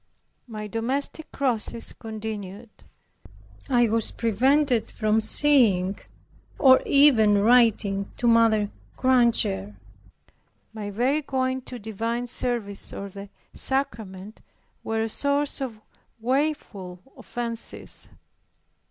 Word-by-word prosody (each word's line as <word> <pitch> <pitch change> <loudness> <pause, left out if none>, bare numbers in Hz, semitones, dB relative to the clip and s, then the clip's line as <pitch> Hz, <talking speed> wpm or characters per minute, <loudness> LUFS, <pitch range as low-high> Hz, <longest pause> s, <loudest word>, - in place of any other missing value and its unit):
My 215 -2 -6
domestic 255 +8 -3
crosses 235 -4 -1
continued. 215 -1 -7 1.0
I 240 -2 +4
was 225 0 0
prevented 250 +3 +1
from 215 0 +1
seeing 215 -7 +3 0.6
or 260 -2 +6
even 235 -8 +5
writing 205 -3 +3
to - - -3
Mrs. 225 -3 +4 0.3
Granger. 235 - +2 1.0
My 210 -2 -5
very 250 +9 +1
going 260 -2 -1
to 250 - -6
divine 230 +2 -3
service 235 -4 -2
or 200 - -6
the 200 +1 -10 0.2
sacrament, 215 -7 -4 0.4
were 225 0 -1
a - - -1
source 280 +5 -1
of 235 -5 -5 0.4
woeful 235 -8 -2 0.2
offences. 235 -1 -5
230 Hz, 95 wpm, -25 LUFS, 210-260 Hz, 1.0 s, or